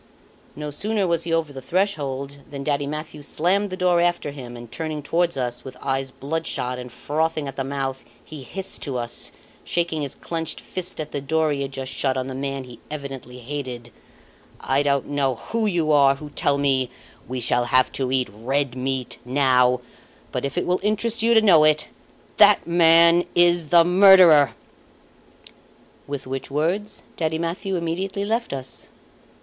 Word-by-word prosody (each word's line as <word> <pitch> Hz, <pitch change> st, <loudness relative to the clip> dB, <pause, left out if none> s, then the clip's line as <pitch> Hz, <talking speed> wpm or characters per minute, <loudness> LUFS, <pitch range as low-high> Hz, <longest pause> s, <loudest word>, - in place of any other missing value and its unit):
No 150 Hz, 0 st, -5 dB
sooner 205 Hz, +6 st, -1 dB
was 170 Hz, -2 st, 0 dB
he 170 Hz, -, -3 dB
over 165 Hz, -3 st, 0 dB
the 135 Hz, -, -7 dB
threshold 140 Hz, -5 st, -2 dB
than 140 Hz, -1 st, -6 dB
Daddy 145 Hz, -1 st, -1 dB
Mathieu 150 Hz, 0 st, -6 dB
slammed 190 Hz, +8 st, 0 dB
the 185 Hz, -, -5 dB
door 180 Hz, -2 st, +3 dB
after 175 Hz, -4 st, 0 dB
him 125 Hz, -4 st, -9 dB
and, 120 Hz, -1 st, -11 dB
turning 155 Hz, -2 st, -4 dB
towards 170 Hz, +1 st, 0 dB
us, 125 Hz, -2 st, -3 dB
with 130 Hz, -1 st, -10 dB
eyes 135 Hz, 0 st, -2 dB
bloodshot, 135 Hz, -3 st, -3 dB
and 125 Hz, -1 st, -8 dB
frothing 155 Hz, +4 st, -1 dB
at 135 Hz, -, -7 dB
the 135 Hz, -, -2 dB
mouth, 135 Hz, -1 st, -3 dB, 0.2 s
he 155 Hz, -2 st, -9 dB
hissed 195 Hz, +8 st, -6 dB
to 135 Hz, -4 st, -3 dB
us, 120 Hz, -1 st, -4 dB, 0.3 s
shaking 170 Hz, -3 st, -1 dB
his 140 Hz, -2 st, -4 dB
clenched 165 Hz, -1 st, -4 dB
fist 185 Hz, -2 st, -6 dB
at 155 Hz, -, -4 dB
the 140 Hz, -, -3 dB
door 155 Hz, +2 st, +1 dB
he 140 Hz, -1 st, -2 dB
had 135 Hz, 0 st, -3 dB
just 135 Hz, -1 st, -5 dB
shut 135 Hz, -1 st, 0 dB
on 130 Hz, -, -1 dB
the 130 Hz, -, -6 dB
man 135 Hz, 0 st, -3 dB
he 125 Hz, -1 st, -12 dB
evidently 135 Hz, -4 st, -7 dB
hated: 125 Hz, -2 st, -6 dB, 0.7 s
"I 135 Hz, +1 st, +1 dB
don't 140 Hz, -1 st, +1 dB
know 140 Hz, -3 st, 0 dB
who 225 Hz, -, -2 dB
you 170 Hz, -5 st, +1 dB
are 140 Hz, -2 st, +5 dB
who 150 Hz, +1 st, -10 dB
tell 140 Hz, 0 st, +1 dB
me 135 Hz, -3 st, +1 dB, 0.4 s
'We 130 Hz, +1 st, -4 dB
shall 120 Hz, +1 st, +1 dB
have 130 Hz, +1 st, +3 dB
to 130 Hz, -2 st, -2 dB
eat 130 Hz, -1 st, +1 dB
red 130 Hz, +4 st, -1 dB
meat 130 Hz, 0 st, -3 dB
now'; 125 Hz, -1 st, +3 dB, 0.5 s
but -, -, -3 dB
if 140 Hz, -, -4 dB
it 175 Hz, -, 0 dB
will 180 Hz, +1 st, +1 dB
interest 215 Hz, +3 st, 0 dB
you 230 Hz, +1 st, +4 dB
to 220 Hz, -, +6 dB
know 170 Hz, -7 st, +7 dB
it 155 Hz, 0 st, +3 dB, 0.5 s
that -, -, +6 dB
man 170 Hz, 0 st, +5 dB
is 175 Hz, -2 st, +4 dB
the 170 Hz, +1 st, +6 dB
murderer!" 180 Hz, -5 st, +7 dB, 1.5 s
With 140 Hz, -1 st, -5 dB
which 135 Hz, 0 st, -5 dB
words 170 Hz, +9 st, -2 dB
Daddy 160 Hz, -1 st, -1 dB
Mathieu 175 Hz, +4 st, -3 dB
immediately 185 Hz, +4 st, -2 dB
left 230 Hz, +3 st, -1 dB
us. 135 Hz, -1 st, -5 dB
145 Hz, 175 wpm, -23 LUFS, 135-170 Hz, 1.5 s, know